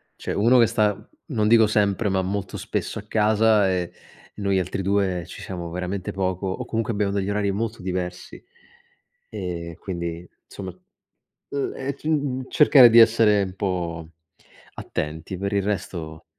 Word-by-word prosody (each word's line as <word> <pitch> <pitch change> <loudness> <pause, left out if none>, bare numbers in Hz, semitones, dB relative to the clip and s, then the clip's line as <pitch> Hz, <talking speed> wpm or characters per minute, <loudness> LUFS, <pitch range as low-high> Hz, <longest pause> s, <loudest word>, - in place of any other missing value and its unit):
Cioè - - -5
uno 115 +5 +4
che 115 - +7
sta, 105 -2 0 0.2
non 110 -8 0
dico 115 -1 +6
sempre, 105 0 +1
ma 95 0 +1
molto 95 +1 -3
spesso - - -3
a - - -9
casa 110 -1 +3
e 90 -2 -1 0.4
noi 100 -2 0
altri 90 +2 -3
2 95 -3 0
ci - - -10
siamo 85 -3 -6
veramente 90 +2 -4
poco 95 0 -2
o 95 - -3
comunque 115 0 -2
abbiamo 100 -1 0
degli 100 0 -1
orari 100 -1 0
molto 110 +1 -3
diversi 90 -1 -5 0.9
e 85 -2 -5
quindi 85 -2 -5 0.2
insomma, 95 -2 -8 0.7
mhmm, 140 -1 -2
ehm, 135 +1 -4 0.2
uhm, 130 -3 -1
cercare 135 -5 +7
di 115 +1 +7
essere 110 -3 +5
un 95 0 -6
po' 85 -5 -3 0.7
attenti. 80 +4 -5
Per 100 +1 -3
il 100 -1 +1
resto, 90 -6 -4
100 Hz, 155 wpm, -23 LUFS, 90-110 Hz, 0.9 s, che